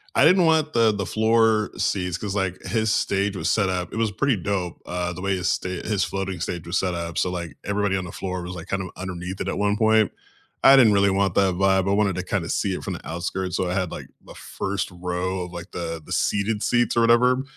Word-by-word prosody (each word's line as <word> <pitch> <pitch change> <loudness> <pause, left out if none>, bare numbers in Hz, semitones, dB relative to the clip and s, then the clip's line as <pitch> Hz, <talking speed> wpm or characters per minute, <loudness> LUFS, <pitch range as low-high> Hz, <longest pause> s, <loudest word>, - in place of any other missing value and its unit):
I - - +5
didn't 180 +2 +5
want 160 -1 +2
the 115 -2 +4
the 100 -2 -3
floor 110 0 +2
seats, 90 -3 -1
'cause, 100 0 -4
like, 95 -2 -1
his 110 -2 0
stage 100 0 0
was 85 - 0
set 105 -4 +2
up 90 -1 -3
it - - -4
was 115 -1 +1
pretty 130 +3 +1
dope, 90 -2 -3
uh, 90 0 -2
the 90 - -8
way 100 0 0
his 90 -2 -2
sta - - -1 0.2
his 105 -3 +1
floating 95 -2 -3
stage 85 -1 -4
was 85 +1 0
set 90 -2 -1
up, 85 -1 -5
so, 90 - +1
like, 85 -3 -5
everybody 100 -1 0
on 95 -1 -2
the 90 - -8
floor 95 -1 -4
was, 90 +1 -6
like, 85 -2 -8
kind 95 - -1
of 95 - -6
underneath 90 0 -6
it - - -3
at - - -2
one 105 0 +1
point. 110 -1 +3 0.5
I 135 - +9
didn't 120 -6 +6
really 100 0 +4
want 95 -1 +1
that 95 -2 +3
vibe, 95 0 +2
I - - +2
wanted 100 -2 +2
to 95 - -3
kinda 90 -2 -2
see 100 - 0
it - - -5
from - - -3
the - - -8
outskirts, 90 +2 -3
so 90 - -1
I - - -1
had, 95 -3 -1
like, - - -7 0.2
the - - -12
first 95 -1 -4
row 90 +1 -3
of, 90 - -12
like, 85 0 -8
the 85 -2 -5
the - - -13
seated 105 +1 0
seats 120 -1 +1
or - - +5
whatever, 125 +3 +4
95 Hz, 255 wpm, -24 LUFS, 90-105 Hz, 0.5 s, I